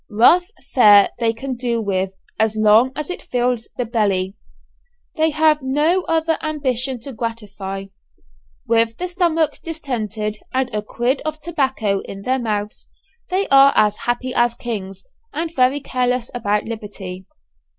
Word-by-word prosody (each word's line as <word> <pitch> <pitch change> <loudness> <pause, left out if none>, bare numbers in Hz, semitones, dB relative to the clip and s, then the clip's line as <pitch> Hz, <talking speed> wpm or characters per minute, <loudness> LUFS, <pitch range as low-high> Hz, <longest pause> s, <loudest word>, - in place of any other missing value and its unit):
Rough 245 +12 +5 0.3
fare 205 -5 +7
they 230 -2 +2
can 255 +3 -5
do 240 -1 -1
with, 190 -3 -1 0.3
as 220 0 +2
long 215 +4 +5
as 300 +3 -4
it - - -5
fills 245 -2 -1
the 245 - -1
belly. 200 -4 0 0.8
They 315 -1 +3
have 310 0 +3
no 300 +8 +2
other 325 0 +1
ambition 265 -4 -1
to 275 +3 -6
gratify. 205 -4 -5 0.8
With 230 0 +2
the 360 - -3
stomach 340 -3 0
distended 220 -9 -4
and 260 -2 -1
a 210 - 0
quid 240 +5 -1
of 310 0 -4
tobacco 265 -11 0
in 195 0 -9
their 260 +3 +1
mouths, 210 -3 -3 0.4
they 380 +2 0
are 275 0 +7
as 210 -1 +3
happy 245 +1 -1
as 240 -1 +2
kings, 200 - -6 0.3
and 330 +1 -3
very 255 +2 +3
careless 250 -3 -1
about 210 -4 0
liberty. 200 -4 -7
240 Hz, 145 wpm, -20 LUFS, 215-285 Hz, 0.8 s, fare